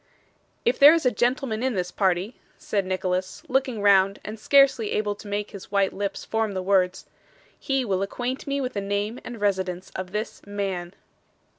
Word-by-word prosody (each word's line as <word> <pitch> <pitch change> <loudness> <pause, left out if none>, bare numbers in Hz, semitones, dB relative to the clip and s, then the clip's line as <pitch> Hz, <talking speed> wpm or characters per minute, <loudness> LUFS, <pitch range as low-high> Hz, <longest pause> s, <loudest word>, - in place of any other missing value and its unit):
'If 240 - +2
there 290 +3 +9
is 330 - -1
a 250 - +4
gentleman 240 0 0
in 260 -2 0
this 180 -1 -2
party,' 190 +4 0 0.2
said 200 -3 -2
Nicholas, 185 0 -2
looking 255 -5 0
round 195 -1 +4
and 215 +1 -6
scarcely 270 -4 +4
able 210 -1 0
to 205 - -12
make 205 0 -3
his 200 -1 -10
white 200 -1 +2
lips 200 0 -4
form 220 -2 -1
the 185 -1 -3
words, 190 -1 +1 0.5
'he 270 -2 0
will 190 -3 0
acquaint 245 +7 -3
me 280 0 0
with 255 -2 -3
the 200 - -2
name 205 +4 -2
and 240 -2 -8
residence 190 -3 -1
of 185 -1 -6
this 215 +3 -4
man. 195 -3 -4
205 Hz, 180 wpm, -25 LUFS, 190-240 Hz, 0.5 s, there